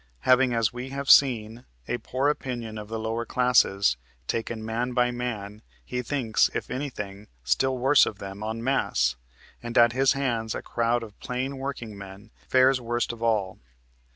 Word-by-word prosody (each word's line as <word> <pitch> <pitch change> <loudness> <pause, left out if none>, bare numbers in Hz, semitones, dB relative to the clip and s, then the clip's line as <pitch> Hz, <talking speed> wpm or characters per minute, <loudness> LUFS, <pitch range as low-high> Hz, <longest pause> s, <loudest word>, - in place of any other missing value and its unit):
Having, 130 -1 +4
as 115 -2 +1
we 125 +2 -6
have 140 0 +1
seen, 115 -4 +4 0.2
a 120 - -2
poor 130 +3 -1
opinion 120 -6 -3
of 105 - -8
the 115 +1 -4
lower 110 +1 -2
classes, 100 - +3 0.3
taken 115 - -3
man 120 +3 -2
by 125 0 +2
man, 110 -4 -5 0.2
he 125 0 -3
thinks, 125 -3 +1
if - - -4
anything, 105 -7 -5 0.2
still 130 - +1
worse 135 +3 +5
of 105 - -5
them 100 0 -8
taken 110 +1 -4
en 115 +1 -4
masse, 65 - +1 0.5
and 120 0 -4
at 120 0 +6
his 135 +1 +3
hands 120 -5 -1
a - - -5
crowd 120 0 0
of 105 -2 -12
plain 130 +2 -3
workingmen 110 -6 -7 0.2
fares 130 0 +4
worst 120 0 -1
of 115 - -12
all. 105 -5 0
120 Hz, 170 wpm, -26 LUFS, 110-130 Hz, 0.5 s, at